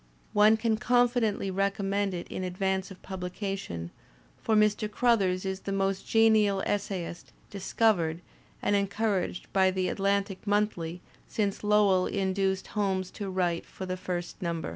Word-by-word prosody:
One 210 +1 +6
can 220 -1 +1
confidently 245 -4 +2
recommend 195 0 0
it 175 - -5
in 185 - -5
advance 190 +1 -1
of 190 - -13
pubUcation^ 185 - -5 0.5
for 220 - +1
Mr. 210 0 +3
Crothers 205 -5 +2
is 190 0 -2
the 195 - -5
most 195 0 -1
genial 215 -3 +4
essayist 195 -4 -3 0.2
"discovered" 190 -4 +1 0.4
and 205 - +2
encouraged 200 -2 0
by 190 -1 +4
the 185 0 0
Atlantic 200 0 -1
Monthly 180 -5 0 0.2
since 205 -2 -2
Lowell 205 -3 +4
induced 190 -1 0
Holmes 190 -3 -1
to 200 -2 -5
write 180 -2 0
for 190 - -7
the 185 0 -2
first 180 -1 -5
number. 170 -2 -2
195 Hz, 140 wpm, -28 LUFS, 185-210 Hz, 0.5 s, One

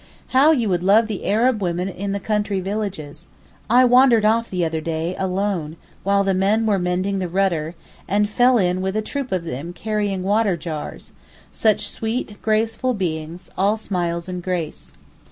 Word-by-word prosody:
How 270 +4 +5
you 245 -8 +1
would 180 -3 0
love 210 +4 +5
the 215 -3 -5
Arab 225 +2 +2
women 180 0 -1
in 195 +1 -4
the 200 - -2
country 205 -1 -1
villages. 185 -6 -5 0.4
I 250 +3 +6
wandered 245 -3 +5
off 230 +2 +2
the 180 -2 -1
other 160 -1 -2
day 165 +2 -2
alone, 185 -4 -2 0.2
while 200 +1 +2
the 195 -1 +1
men 200 +4 +2
were 205 -3 +2
mending 185 +2 -1
the 185 - -2
rudder, 175 -3 0 0.3
and 205 +1 +2
fell 245 +4 +4
in 180 -2 +1
with 190 +1 -2
a 215 - 0
troop 275 +2 -4
of 185 -3 -1
them 165 +2 -5
carrying 205 -1 -2
water 205 -1 +2
jars—such 175 +6 -3
sweet, 220 -1 -4
graceful 225 +3 0
beings, 170 -2 -4
all 200 +3 +2
smiles 175 -5 -2
and 180 -1 -5
grace. 170 - -4
195 Hz, 170 wpm, -21 LUFS, 175-215 Hz, 0.4 s, I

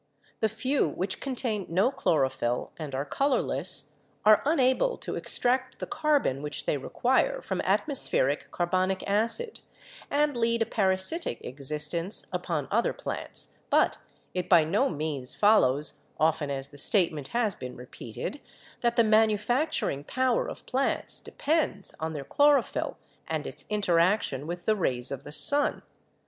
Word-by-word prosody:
The 220 - +2
few 255 - 0
which 185 +5 -3
contain 240 -7 -3
no 190 +10 +2
chlorophyll 135 - 0
and 145 -4 -5
are 135 +2 -2
colorless 275 - 0 0.3
are 215 -1 +7
unable 290 - +2
to - - -5
extract 255 +1 0
the - - -5
carbon 300 - 0
which 150 -1 -5
they - - +1
require 265 - +1
from - - -3
atmospheric 150 - 0
carbonic 185 +2 0
acid 230 - 0 0.5
and 290 -1 +1
lead 230 -1 +1
a - - -5
parasitic 190 - 0
existence 150 - -2
upon 170 -5 -2
other 230 +4 +1
plants, - - -6 0.2
but - - +3 0.3
it 180 -1 -3
by 170 -4 +7
no 205 - +1
means 145 -4 -3
follows, 150 -10 +3 0.2
often 155 -2 +1
as 135 0 -4
the 145 - -11
statement 155 -5 +1
has 230 -4 0
been 125 -5 -8
repeated, 125 - -7 0.4
that 235 -1 0
the 235 - +5
manufacturing 220 - +1
power 255 - 0
of - - -9
plants 270 +2 -1
depends 295 - -1
on 160 0 -3
their 145 -3 -6
chloro 290 - +4
phyll - - -4 0.3
and - - -3
its - - -6
interaction 175 - +1
with 175 +1 -6
the 215 - +3
rays 130 -10 -1
of 140 0 -5
the 145 - -10
sun. 285 - +6
195 Hz, 145 wpm, -28 LUFS, -, 0.5 s, are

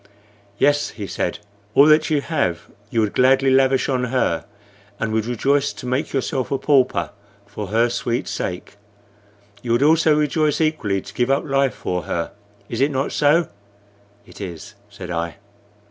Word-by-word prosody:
"Yes," 145 +4 +2
he 105 - -7
said, - - -3 0.4
"all 140 - +8
that 155 0 +4
you 150 -2 +1
have 90 - -1 0.2
you 115 - +1
would 105 -2 -1
gladly 135 +1 +4
lavish 135 0 +3
on 125 -2 0
her, 120 -10 0 0.5
and 110 0 -2
would 110 0 0
rejoice 140 +4 +1
to - - -10
make 130 +4 -1
yourself 135 -1 -2
a 135 - 0
pauper 135 -6 +2 0.3
for 105 0 -7
her 115 +4 +2
sweet 120 +1 -2
sake. 90 +2 -5 0.8
You 120 -1 +1
also 155 +3 +4
would 150 - +2
rejoice 150 0 +1
equally 150 -12 0
to - - -12
give 125 +1 0
up 135 +1 +1
life 135 -2 +1
for 90 -1 -3
her. 85 -1 -3 0.4
Is 115 +3 -4
it 140 - +4
not 135 -1 -2
so?" 150 +3 +3 0.8
"It - - -13
is," 90 0 -7 0.2
said 95 -3 -9
I. 85 -1 -3
130 Hz, 165 wpm, -21 LUFS, 105-145 Hz, 0.8 s, all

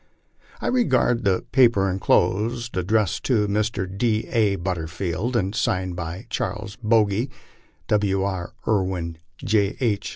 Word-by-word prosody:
I - - -6
regard 130 - +2
the 95 -2 +1
paper 115 -6 +4
enclosed, 110 +5 +1
addressed 95 +1 +1
to 110 -5 +2
Mr. 105 -1 0
D. 110 +3 0
A. 105 -4 +2
But 95 0 -2
terfield, 90 +8 -3
and 100 -3 0
signed 95 -5 -1
by 85 +4 -5
Charles 105 -1 -3
Bogy, 110 +1 +2 0.6
W. 100 -2 +1
B. 95 -3 -3 0.2
Irwin, 95 -5 -1 0.2
J. 100 -1 +1
H. 105 -5 0
100 Hz, 130 wpm, -23 LUFS, 95-115 Hz, 0.6 s, paper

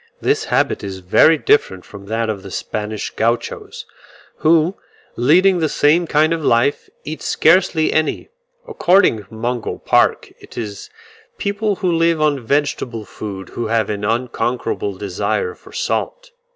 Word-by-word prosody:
This - - 0
habit - - 0
is 95 -1 -5
very 95 - +4
different 95 -11 +1
from 100 -1 -12
that 115 +1 -1
of 105 -3 -3
the 100 - -10
Spanish 105 +2 -4
Gauchos, 115 +1 -2 0.5
who, 165 +3 +3 0.4
leading 180 +9 +4
the 160 -2 +1
same 165 +5 +2
kind 155 +2 +3
of 165 -2 -3
life, 120 +3 +1
eat 155 +1 -6
scarcely 165 -1 +3
any; 155 - -1 0.4
according 195 - +3
to - - -30
Mungo 120 +1 -3
Park, - - +1
it - - -15
is 105 -4 -6 0.5
people 205 +1 -1
who 185 -2 -1
live 165 -1 +2
on 145 -4 +1
vegetable 125 -4 -1
food 100 -3 -8
who 120 - -4
have 110 -2 0
an 105 -1 -4
unconquerable 115 -2 -2
desire 105 - -2
for - - -17
salt. - - -3
130 Hz, 145 wpm, -18 LUFS, 110-165 Hz, 0.5 s, very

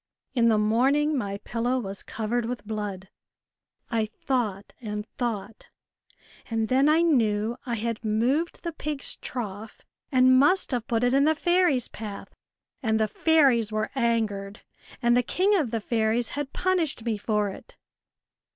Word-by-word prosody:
In 235 -3 +3
the 220 - +4
morning 265 +8 +2
my 200 -6 -2
pillow 240 +3 -1
was 195 -5 -4
covered 230 +1 -2
with 245 -2 -5
blood. 205 -3 -4 0.8
I 225 -2 +1
thought 215 -3 -3
and 210 -2 -4
thought, 225 -4 -5 0.8
and 225 -1 -1
then 270 +3 +4
I 320 +2 +4
knew 225 -7 +2
I 235 - -1
had 230 0 -3
moved 245 +10 0
the 340 - -2
pig's 300 -3 -5
trough 215 -3 -6 0.3
and 255 -1 +6
must 330 +7 +3
have 240 -3 -2
put 230 0 0
it 245 +1 +3
in 275 +1 +4
the 315 +1 +3
fairies' 345 -7 +2
path 210 -3 -8 0.5
and 220 -3 +1
the 220 - +2
fairies 265 -6 +3
were 215 0 -2
angered, 220 -5 -1 0.4
and 240 0 +4
the 245 - +4
king 375 - +1
of 305 - +1
the 230 0 -1
fairies 225 +1 0
had 285 -1 -4
punished 340 -10 0
me 230 -2 0
for 210 -1 0
it." - - -12
235 Hz, 155 wpm, -26 LUFS, 215-275 Hz, 0.8 s, and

